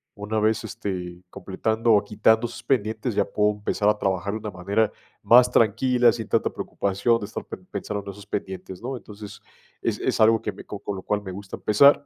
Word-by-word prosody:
Una 105 Hz, +2 st, -2 dB
vez, 110 Hz, +1 st, +1 dB
este, 90 Hz, -4 st, -5 dB
completando 110 Hz, +5 st, 0 dB
o 105 Hz, 0 st, +4 dB
quitando 110 Hz, +3 st, +3 dB
esos 120 Hz, +1 st, -9 dB
pendientes, 110 Hz, -2 st, 0 dB
ya -, -, +3 dB
puedo 105 Hz, 0 st, +1 dB
empezar 105 Hz, 0 st, -1 dB
a 105 Hz, 0 st, +4 dB
trabajar 95 Hz, 0 st, -1 dB
de 110 Hz, -, -3 dB
una 105 Hz, -1 st, -6 dB
manera 100 Hz, +5 st, 0 dB, 0.3 s
más 125 Hz, +1 st, +7 dB
tranquila, 120 Hz, +2 st, +4 dB
sin 115 Hz, -2 st, -5 dB
tanta -, -, +1 dB
preocupación, 100 Hz, +4 st, 0 dB
de 105 Hz, -, -5 dB
estar 110 Hz, -, -7 dB
pe -, -, -6 dB, 0.2 s
pensando 100 Hz, 0 st, -4 dB
en 100 Hz, -, -6 dB
esos 100 Hz, +1 st, -13 dB
pendientes, 95 Hz, -1 st, -5 dB
¿no? 130 Hz, +1 st, -4 dB
Entonces, 105 Hz, -2 st, -11 dB, 0.4 s
es -, -, -1 dB
es -, -, -1 dB
algo 110 Hz, 0 st, +5 dB
que 105 Hz, -, -3 dB
me -, -, -12 dB
co 100 Hz, -, -7 dB
con 100 Hz, -1 st, -5 dB
lo 95 Hz, -, -8 dB
cual 105 Hz, 0 st, -1 dB
me 95 Hz, -2 st, -7 dB
gusta 95 Hz, +1 st, -7 dB
empezar. 140 Hz, +6 st, +5 dB
105 Hz, 210 wpm, -24 LUFS, 100-110 Hz, 0.4 s, más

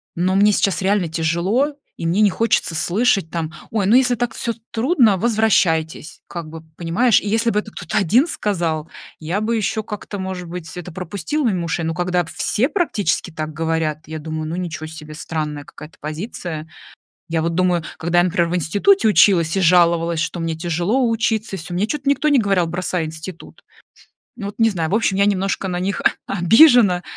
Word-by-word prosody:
но 185 Hz, +2 st, +1 dB
мне 205 Hz, +2 st, +5 dB
сейчас 195 Hz, -2 st, +1 dB
реально 195 Hz, -2 st, +1 dB
тяжело 170 Hz, -, 0 dB, 0.2 s
и -, -, -5 dB
мне 180 Hz, +6 st, +2 dB
не 205 Hz, -3 st, +5 dB
хочется 225 Hz, -6 st, +1 dB
слышать 195 Hz, +2 st, +1 dB
там: 165 Hz, -1 st, -4 dB, 0.2 s
"Ой, 210 Hz, -3 st, 0 dB
ну 210 Hz, +5 st, +4 dB
если 250 Hz, -1 st, +4 dB
так 240 Hz, -1 st, -2 dB
всё 235 Hz, -, -2 dB, 0.2 s
трудно, 235 Hz, -, +3 dB
возвращайтесь". 185 Hz, -8 st, +1 dB
Как 170 Hz, -3 st, -7 dB
бы 165 Hz, 0 st, -9 dB, 0.2 s
понимаешь. 185 Hz, +8 st, +2 dB
И 205 Hz, -, -4 dB
если 230 Hz, +2 st, +1 dB
бы 210 Hz, -, +1 dB
это 215 Hz, 0 st, -8 dB
кто-то 175 Hz, +4 st, -4 dB
один 230 Hz, -, +3 dB
сказал, 170 Hz, -, -2 dB, 0.3 s
я 165 Hz, +5 st, -2 dB
бы 225 Hz, +2 st, 0 dB
еще 220 Hz, 0 st, -1 dB
как-то 210 Hz, -1 st, -7 dB
может 185 Hz, -2 st, -5 dB
быть 175 Hz, -2 st, -7 dB
это 180 Hz, 0 st, -7 dB
пропустил 195 Hz, -, -3 dB
мимо 185 Hz, -7 st, 0 dB
ушей. 165 Hz, 0 st, -2 dB
Но 165 Hz, -, -1 dB
когда 180 Hz, 0 st, 0 dB
все 215 Hz, +8 st, 0 dB
практически 295 Hz, -, -1 dB
так 155 Hz, -1 st, -5 dB
говорят, 160 Hz, -1 st, -1 dB
я 160 Hz, 0 st, -5 dB
думаю: 155 Hz, 0 st, -5 dB
"Ну, 165 Hz, -, -3 dB
ничего 170 Hz, -3 st, -5 dB
себе, 155 Hz, -1 st, -10 dB
странная 150 Hz, -2 st, -4 dB
какая-то 150 Hz, +2 st, -13 dB
позиция". 160 Hz, 0 st, -6 dB, 0.6 s
Я 165 Hz, -1 st, 0 dB
вот 165 Hz, +1 st, -1 dB
думаю, 180 Hz, -1 st, +1 dB
когда 170 Hz, +1 st, 0 dB
я, 175 Hz, -, +5 dB
например, 170 Hz, -1 st, +1 dB
в 180 Hz, -, -1 dB
институте 205 Hz, -, +2 dB
училась 185 Hz, -5 st, +4 dB
и -, -, +2 dB
жаловалась, 170 Hz, -2 st, +3 dB
что 175 Hz, -, -3 dB
мне 165 Hz, -1 st, -2 dB
тяжело 175 Hz, +10 st, 0 dB
учиться, 225 Hz, -3 st, -1 dB
всё 175 Hz, +1 st, -7 dB
мне 195 Hz, +4 st, 0 dB
что-то 290 Hz, 0 st, -3 dB
никто 285 Hz, +2 st, +1 dB
не 290 Hz, -2 st, +4 dB
говорил: 195 Hz, -6 st, +2 dB
"бросай 175 Hz, 0 st, -2 dB
институт". 160 Hz, +3 st, -9 dB, 0.7 s
Ну, 210 Hz, -4 st, -6 dB
вот 205 Hz, -, -9 dB
не 225 Hz, 0 st, +5 dB
знаю 165 Hz, -5 st, -2 dB
в -, -, +2 dB
общем, 215 Hz, -3 st, +1 dB
я 200 Hz, -, +4 dB
немножко 195 Hz, -1 st, 0 dB
на 180 Hz, -1 st, -2 dB
них 195 Hz, +3 st, -2 dB
о -, -, -1 dB
обижена, 220 Hz, -, +6 dB
180 Hz, 190 wpm, -20 LUFS, 165-215 Hz, 0.7 s, обижена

